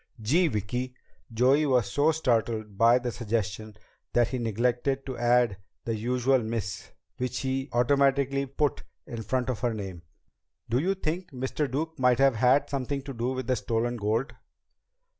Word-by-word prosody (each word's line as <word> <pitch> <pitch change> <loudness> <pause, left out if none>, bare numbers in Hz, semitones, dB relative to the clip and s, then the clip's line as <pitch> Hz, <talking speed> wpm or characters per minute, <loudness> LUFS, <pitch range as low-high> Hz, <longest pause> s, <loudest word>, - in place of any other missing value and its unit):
"Gee, 155 +12 +3
Vicki!" 125 +2 -3 0.4
Joey 130 +6 +3
was 125 -7 +2
so 145 +8 +3
startled 115 -8 0
by 115 +4 +5
the 125 -1 -3
suggestion 110 -2 -3 0.4
that 120 -1 +3
he 130 - -3
neglected 120 +4 0
to 130 - -5
add 120 -3 +2 0.3
the 115 - -1
usual 125 +4 +2
"Miss" 110 -4 -4 0.3
which 125 0 -2
he 135 +1 -2
automatically 140 +2 +2
put 140 +1 -1 0.2
in 115 -2 -6
front 125 +3 -1
of 115 - -5
her 120 -1 0
name. 95 -5 -6 0.7
"Do 120 +2 +1
you 190 +6 +1
think 180 0 -3
Mr. 130 +1 -2
Duke 160 +3 -3
might 125 -1 +4
have 135 -1 +5
had 125 +5 +4
something 140 0 -3
to 140 -1 -6
do 120 +2 -2
with 130 -1 -4
the 130 - +1
stolen 120 +1 -1
gold?" 110 +6 -1
125 Hz, 160 wpm, -27 LUFS, 115-135 Hz, 0.7 s, by